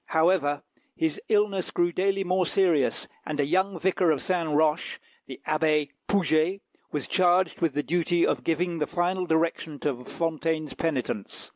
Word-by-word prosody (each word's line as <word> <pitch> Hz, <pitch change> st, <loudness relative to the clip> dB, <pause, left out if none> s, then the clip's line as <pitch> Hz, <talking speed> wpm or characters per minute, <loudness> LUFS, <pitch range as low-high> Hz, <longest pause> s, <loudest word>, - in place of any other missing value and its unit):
However, 160 Hz, -3 st, +2 dB, 0.3 s
his 160 Hz, -2 st, -1 dB
illness 205 Hz, -3 st, +1 dB
grew 175 Hz, 0 st, +1 dB
daily 195 Hz, +2 st, 0 dB
more 185 Hz, -1 st, +1 dB
serious, 165 Hz, -9 st, +2 dB, 0.2 s
and 150 Hz, -1 st, -5 dB
a 145 Hz, -, +3 dB
young 185 Hz, +4 st, 0 dB
vicar 185 Hz, -1 st, +2 dB
of 150 Hz, -3 st, +2 dB
Saint 175 Hz, -2 st, -1 dB
Roch, 150 Hz, 0 st, +1 dB, 0.3 s
the -, -, -9 dB
Abbé 155 Hz, -1 st, +2 dB, 0.2 s
Poujet, 180 Hz, -1 st, +2 dB, 0.3 s
was 145 Hz, -2 st, -3 dB
charged 180 Hz, -1 st, +2 dB
with 165 Hz, -4 st, +1 dB
the 145 Hz, -, 0 dB
duty 175 Hz, +1 st, +1 dB
of -, -, -1 dB
giving 170 Hz, +1 st, -1 dB
the 150 Hz, -, 0 dB
final 180 Hz, +1 st, -1 dB
direction 160 Hz, -1 st, 0 dB
to 130 Hz, -4 st, -2 dB
Fontaine's 160 Hz, 0 st, -2 dB
penitence. 130 Hz, -10 st, -3 dB
165 Hz, 155 wpm, -26 LUFS, 155-185 Hz, 0.3 s, a